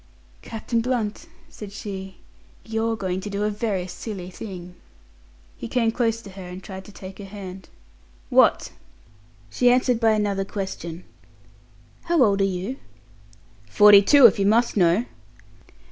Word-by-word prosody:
"Captain 230 +1 -3
Blunt," 240 +3 -2 0.2
said 210 -9 -10
she, 190 -2 -7 0.5
"you're 225 0 -1
going 190 -3 -3
to 205 - -6
do 200 +1 -2
a 210 - 0
very 205 -3 -2
silly 185 -1 -7
thing." 180 -3 -9 0.8
He - - -6
came 230 -1 +1
close 230 -1 -1
to 200 - -11
her 190 0 -10
and 180 +1 -9
tried 190 -2 -9
to 205 - -12
take 190 0 -11
her 200 - -7
hand. 190 -2 -9 0.6
"What?" - - +4 0.8
She 245 - +3
answered 250 -1 +2
by 225 -1 +3
another 205 -2 0
question. 190 -4 -6 1.0
"How 340 -5 +3
old 200 -3 +2
are - - +4
you?" 195 +7 -3 0.9
"Forty 205 - +8
two, 280 +6 +6
if 210 -3 +6
you 195 - +2
must 230 +3 +2
know." 180 +4 +3
205 Hz, 145 wpm, -23 LUFS, 190-225 Hz, 1.0 s, Forty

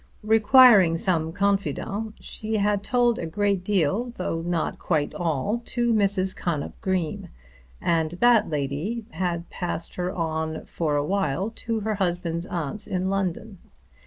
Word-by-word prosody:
Requiring 215 -5 +6
some 165 -3 0
confidant, 200 +2 -1
she 220 0 -3
had 205 0 +1
told 240 +1 +2
a 165 - -3
great 200 +1 0
deal, 200 +5 +1
though 165 -2 -3
not 170 -1 -2
quite 150 -4 0
all, 175 - -1
to 240 -1 0
Mrs. 195 -3 +2
Connop 155 -5 -3
Green, 185 -6 -2 0.5
and 165 -1 0
that 230 +3 +4
lady 150 - -3
had 175 -2 -2
passed 175 -2 -4
her 180 0 -1
on 160 -2 -3
for 155 -3 -2
a 145 0 +1
while 195 +1 -1
to 225 -1 -3
her 215 +1 -1
husband's 175 -3 -2
aunt 175 +5 -4
in 190 -2 -1
London. 195 +1 -3
185 Hz, 140 wpm, -25 LUFS, 165-210 Hz, 0.5 s, Requiring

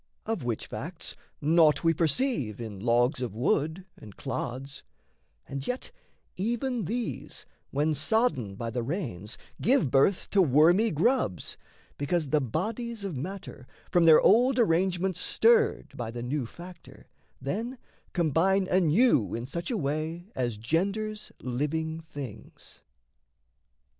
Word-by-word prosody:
Of 220 - -2
which 120 -3 -2
facts - - -6 0.3
Naught 155 +1 +4
we 165 0 +4
perceive 160 - 0
in 110 -4 -6
logs 120 +4 +2
of 120 -5 -3
wood 160 +9 0
and 105 -3 -13
clods; 135 +3 -5 0.7
And 135 0 -5
yet 250 +1 -3 0.4
even 235 +2 -1
these, 235 +5 -4 0.2
when 150 +3 +1
sodden 150 - +1
by 115 +3 -4
the 125 - -2
rains, 115 - -4 0.2
Give 230 - +3
birth 140 +8 +3
to 200 - +5
wormy 170 - +5
grubs, 165 - 0 0.4
because 150 +1 0
the 150 0 +3
bodies 215 - -3
Of 195 -6 -4
matter, 160 -3 -7 0.2
from 175 -1 +4
their 160 -1 +8
old 250 +6 +5
arrangements 185 -3 +2
stirred 460 -1 +2
By 120 -2 -4
the 120 +1 -6
new 130 0 -2
factor, 175 +5 -13 0.3
then 225 - -3 0.3
combine 180 +3 +2
anew 180 - +3
In 115 +1 -4
such 170 +6 -5
a 240 - 0
way 160 +5 -3
as 120 -4 -2
genders 200 - -2
living 160 +6 -2
things. 145 -8 -10
160 Hz, 130 wpm, -28 LUFS, 130-200 Hz, 0.7 s, their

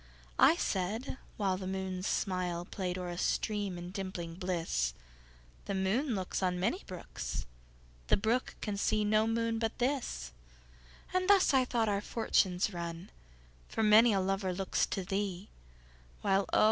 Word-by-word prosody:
I 315 - +7
said 220 - -2 0.2
(whileThe 190 -2 0
moon's 190 -1 -3
smilePlay'd 180 0 -1
o'er 180 -1 -4
a 175 - -5
stream, 205 -4 0
in 175 +1 -7
dimpling 185 -4 -5
bliss),The - - -4
moon 220 +8 +1
looksOn 185 -1 -1
many 195 - 0
brooks, 180 -2 -5 0.6
The - - +4
brook 230 +5 0
can 205 -1 -2
see 210 +1 +1
no 215 +1 +3
moon 230 0 0
but 225 -1 -1
this; 240 - -1 0.8
And 370 +1 +1
thus, 390 -7 +6
I 260 -1 +5
thought, 235 -3 +1
our 200 -1 +1
fortunes 200 -3 +1
run, 170 +1 -5 0.6
For 225 - -1
many 220 +2 +7
a 195 - +2
lover 190 0 0
looks 190 +1 0
to 195 - -2
thee, 195 0 -3 0.7
While 195 0 +2
oh! - - +4
195 Hz, 140 wpm, -32 LUFS, 180-220 Hz, 0.8 s, I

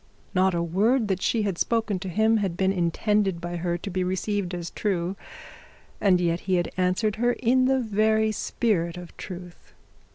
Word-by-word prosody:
Not 185 -1 +3
a 170 - 0
word 210 +7 +2
that 190 -1 0
she 225 -2 +1
had 195 -4 -2
spoken 225 -4 0
to 190 0 -5
him 220 +5 +3
had 190 -5 -2
been 190 0 +2
intended 195 +1 +1
by 175 0 -4
her 175 0 -1
to 185 - -6
be 185 +1 0
received 185 0 -2
as 170 -1 -5
true, 185 -3 -1 0.9
and 190 -3 +4
yet 170 -1 +1
he 185 - +4
had 175 -1 0
answered 185 +4 +1
her 240 +2 +2
in 255 +2 +2
the 265 0 +3
very 220 -1 +2
spirit 185 -6 -1
of 175 -1 -10
truth. 180 -2 -10
190 Hz, 185 wpm, -25 LUFS, 175-220 Hz, 0.9 s, and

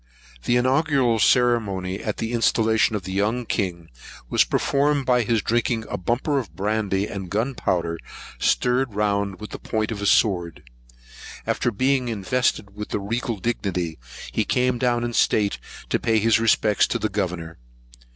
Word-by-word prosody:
The 120 - +2
inaugural 130 -2 +2
ceremony 100 -5 +2
at 105 -1 -3
the 115 +1 -3
installation 110 -1 +2
of 100 - -3
the 95 - -6
young 105 +5 0
king, 85 -6 -3 0.4
was - - +5
performed 140 0 +1
by 125 -1 +3
his 115 -1 0
drinking 115 -1 0
a - - -1
bumper 125 - 0
of 95 -11 -8
brandy 100 0 0
and 95 -3 -6
gunpowder, 90 -7 -1 0.4
stirred 125 - +1
round 100 -2 0
with 105 - -8
the - - -7
point 110 0 -2
of 105 -2 -4
a 100 - 0
sword. 90 -7 +2 0.8
After - - 0
being 130 +3 +1
invested 110 -1 -1
with 105 0 -6
the - - -2
regal 115 +3 -2
dignity, 90 - -2 0.3
he - - 0
came 125 -1 +1
down 120 -1 +1
in 120 0 -3
state, 100 -1 +2 0.3
to - - +1
pay 110 -1 +1
his 115 +1 +3
respects 110 -2 +3
to - - -1
the - - -1
governor. 90 - -4
110 Hz, 160 wpm, -23 LUFS, 100-120 Hz, 0.8 s, was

